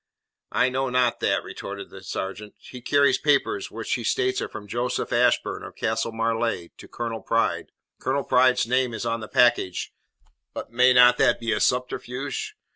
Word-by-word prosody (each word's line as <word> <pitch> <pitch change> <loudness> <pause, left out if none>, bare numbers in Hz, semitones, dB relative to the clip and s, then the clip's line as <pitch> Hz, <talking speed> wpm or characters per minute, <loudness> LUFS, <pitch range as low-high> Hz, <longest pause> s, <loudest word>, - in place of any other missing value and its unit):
"I 130 - +2
know 130 +1 -1
not 125 -1 +1
that," - - +1
retorted 100 0 -8
the 95 - -11
sergeant. 100 +3 -6
"He 125 - -12
carries 140 +3 +3
papers 390 - +1
which - - -4
he - - -2
states 385 0 0
are - - -4
from 105 - -9
Joseph 120 +4 -2
Ashburn, - - +2
of - - -10
Castle 115 +1 -1
Marleigh, 115 -5 -1
to - - -11
Colonel 115 -2 -5
Pride. 115 +4 0 0.3
Colonel 135 +2 -1
Pride's 125 0 +3
name 125 0 0
is 115 - -5
on 115 0 -1
the 110 - -7
package, 120 -7 +2 0.6
but - - -6
may 125 +2 +5
not 125 0 +6
that - - +3
be 115 -1 -2
a 105 - +1
subterfuge? 125 +2 -2
120 Hz, 175 wpm, -24 LUFS, 115-130 Hz, 0.6 s, not